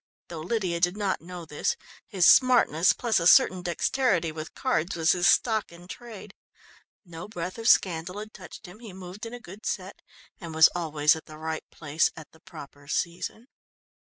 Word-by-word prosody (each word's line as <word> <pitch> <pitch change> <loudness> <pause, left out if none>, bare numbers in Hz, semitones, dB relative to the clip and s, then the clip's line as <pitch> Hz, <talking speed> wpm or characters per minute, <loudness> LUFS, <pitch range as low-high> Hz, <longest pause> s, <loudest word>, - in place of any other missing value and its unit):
Though 165 - -7
Lydia 180 0 -2
did 175 +3 +1
not 200 -3 -1
know 175 0 -9
this, 150 -1 -2 0.3
his 185 -3 +3
smartness, 240 - +5
plus 235 -5 0
a 170 - +2
certain 185 0 +5
dexterity 175 0 0
with 155 0 -8
cards, 195 - -1
was 165 -1 +3
his 175 0 +2
stock 220 -5 +2
in 175 +1 -14
trade. 215 -2 -10 0.7
No 170 0 -9
breath 185 0 -6
of 225 - -3
scandal 175 +1 +2
had 215 +1 -8
touched 185 -2 -12
him, 180 +4 -13
he 225 -5 -11
moved 190 +4 -9
in 230 - -10
a - - -9
good 200 0 -13
set 190 0 -5 0.4
and 165 -3 -8
was 160 0 +7
always 155 -3 +2
at 160 - -11
the 155 - -11
right 160 0 -5
place 155 0 0
at 160 -2 -11
the 160 - -21
proper 145 -5 -13
season. 175 +9 -3
175 Hz, 185 wpm, -26 LUFS, 160-205 Hz, 0.7 s, was